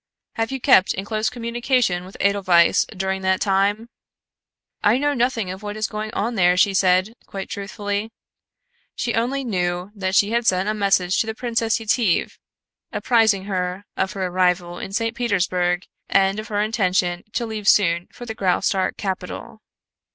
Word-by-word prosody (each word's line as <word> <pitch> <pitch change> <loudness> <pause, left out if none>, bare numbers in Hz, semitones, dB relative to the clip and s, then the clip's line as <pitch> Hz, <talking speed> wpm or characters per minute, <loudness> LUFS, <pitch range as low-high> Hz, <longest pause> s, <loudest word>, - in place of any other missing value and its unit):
"Have 225 0 -2
you 270 - -3
kept 245 -8 +4
in 195 - -4
close 215 +1 -1
communication 235 -5 0
with 190 - -12
Edelweiss 185 -4 +3
during 190 -1 -3
that 190 0 +1
time?" 205 +3 +1 1.0
"I 210 +4 +4
know 290 +2 +1
nothing 235 -6 0
of 190 +1 -8
what 210 0 -5
is 215 - -1
going 215 0 -5
on 230 +4 -1
there," 180 -4 +3
she 195 +1 +4
said, 185 +2 +3
quite 195 -1 -6
truthfully. 205 +1 -3 0.9
She 235 - -2
only 255 +5 0
knew 180 -4 -2
that 190 -2 -2
she 205 +2 +4
had 235 0 0
sent 185 +1 +2
a 215 - +1
message 195 -3 +1
to 225 - +1
the 220 - -4
Princess 230 -2 0
Yetive, 220 -4 0 0.5
apprising 220 -5 +2
her 185 0 -3
of 190 - -1
her 190 -2 -2
arrival 180 -1 0
In - - -6
St. 225 +3 -1
Petersburg 180 -5 0 0.2
and 195 +1 +2
of 215 - -6
her 205 -2 -1
intention 185 -5 0
to 240 - -1
leave 215 -2 -5
soon 175 -5 +4
for 245 - -10
the 225 - -5
Graustark 190 -1 0
capital. 190 +2 -5
200 Hz, 165 wpm, -22 LUFS, 185-225 Hz, 1.0 s, kept